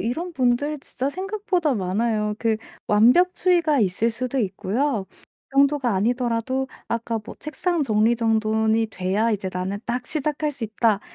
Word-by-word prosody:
이런 330 +10 -3
분들 275 +2 +1
진짜 265 0 -3
생각보다 375 - -1
많아요. 210 +2 0
그 225 -1 +1 0.3
완벽주의가 325 - +4
있을 205 +4 +1
수도 255 +3 -3
있고요. 210 +3 -1 0.4
그 275 - -11
정도가 275 -4 +3
아니더라도 240 +4 0 0.2
아까 230 0 -2
뭐 - - -9
'책상 335 +2 -1
정리 220 -2 +3
정돈이 220 -1 +1
돼야 200 +5 0
이제 200 -3 -1
나는 185 +2 -3
딱 245 +1 -2
시작할 300 0 -1
수 275 -5 -5
있다.' 215 -1 +1
235 Hz, 310 characters per minute, -23 LUFS, 215-290 Hz, 0.4 s, 완벽주의가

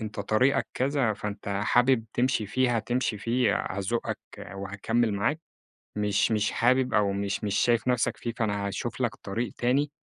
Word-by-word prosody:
أنتَ 105 -2 -5
طريقك 110 +7 +2
كذا، 135 -3 +1
فأنت 105 -1 -6 0.2
حابب 125 0 +3
تمشي 125 -3 +1
فيه، 120 +3 +1
هتمشي 115 -1 -1
فيه، 115 -1 +1 0.2
هازُقك 100 +5 -2 0.4
وهاكمل 100 +3 -1
معاك. 150 +11 0 0.6
مش 105 +1 +1
مش 105 -1 +1
حابب، 130 +2 +2
أو 105 -1 +3
مش 100 +1 -2
مش 100 -1 -1
شايف 120 -1 +2
نفسك 125 -2 +1
فيه، 120 - -4
فأنا 105 -3 -1
هاشوف 100 - -4
لَك - - 0
طريق 115 +4 -4
تاني. 135 +4 +1
115 Hz, 155 wpm, -27 LUFS, 100-125 Hz, 0.6 s, حابب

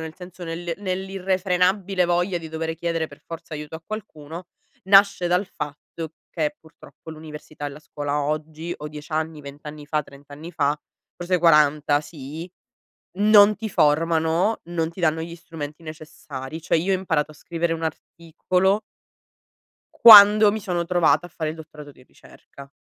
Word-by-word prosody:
nel 160 0 -7
senso 180 0 -11
nel 170 0 -4
nell'irrefrenabile 190 0 0
voglia 175 +1 0
di 160 -1 -9
dovere 160 0 -4
chiedere 165 -1 -2
per - - -16
forza 165 -1 -8
aiuto 150 +1 -7
a 160 - -15
qualcuno, 175 -5 -8 0.4
nasce 195 -2 +5
dal 180 +2 +1
fatto 150 0 -7 0.2
che, 155 -3 -2
purtroppo, 160 -1 -15
l'università 155 -1 -9
e - - -2
la 140 - -11
scuola 145 -1 -3
oggi 155 +3 -4
o 150 - -7
10 150 +1 -10
anni, 155 0 -2
20 140 0 -11
anni 150 0 -9
fa, 150 0 -1
30 140 0 -16
anni 150 +4 -9
fa, 145 -3 0 0.4
forse 180 +1 0
40 150 -3 +4
sì, 155 +3 -9 0.7
non 210 0 +6
ti 220 - -4
formano, 165 +5 +2
non 165 -1 -2
ti 170 +2 -10
danno 160 -1 +1
gli 170 +1 -7
strumenti 160 -1 -9
necessari. 155 -1 -9
Cioè 165 - +1
io 185 +4 0
ho 185 - +2
imparato 160 -5 -1
a - - -14
scrivere 165 +2 -3
un 165 0 -5
articolo 180 +5 -1 1.1
quando 210 -1 +9
mi 220 - -3
sono 175 -4 -2
trovata 175 0 +2
a - - -21
fare 155 -2 -4
il - - -10
dottorato 150 -2 -12
di 130 - -20
ricerca. 140 +1 -16
165 Hz, 165 wpm, -23 LUFS, 150-180 Hz, 1.1 s, quando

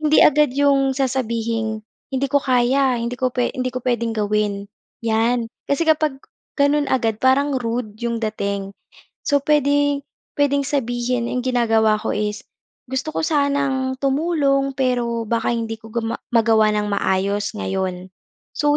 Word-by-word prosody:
Hindi 305 0 +4
agad 300 -2 +4
'yong 275 -1 +2
sasabihing 230 -4 -1 0.3
"hindi 265 +1 0
ko 285 - +4
kaya, 255 +1 +2
hindi 235 +1 -3
ko 255 -1 +1
pwe 250 -1 +1
hindi 255 0 -1
ko 255 - -2
puwedeng 235 -2 0
gawin" 205 -1 0 0.4
'yan. 230 +1 +1 0.2
Kasi 280 +4 +1
kapag 305 -3 +2 0.4
gano'n 290 +1 +3
agad 225 -4 +1
parang 270 +2 +3
rude 230 -3 -3
'yong 235 -1 -2
dating. 200 -3 -3 0.5
So, 285 -1 +3
puwede 285 -1 +2 0.4
puwedeng 285 -1 +2
sabihin 245 -3 -1
'yong 250 - 0
ginagawa 225 -3 +3
ko 225 - -2
is 210 0 -3 0.4
gusto 265 +4 -2
ko - - -1
sanang 280 -3 0
tumulong 275 -1 +1
pero 240 -3 0
baka 230 0 0
hindi 225 -1 -3
ko 225 0 -13
guma 230 -1 -2 0.2
magawa 225 -2 +4
ng 210 0 0
maayos 200 +1 0
ngayon. 185 -2 -3 0.5
So, 295 0 +2
245 Hz, 145 wpm, -21 LUFS, 225-275 Hz, 0.5 s, Hindi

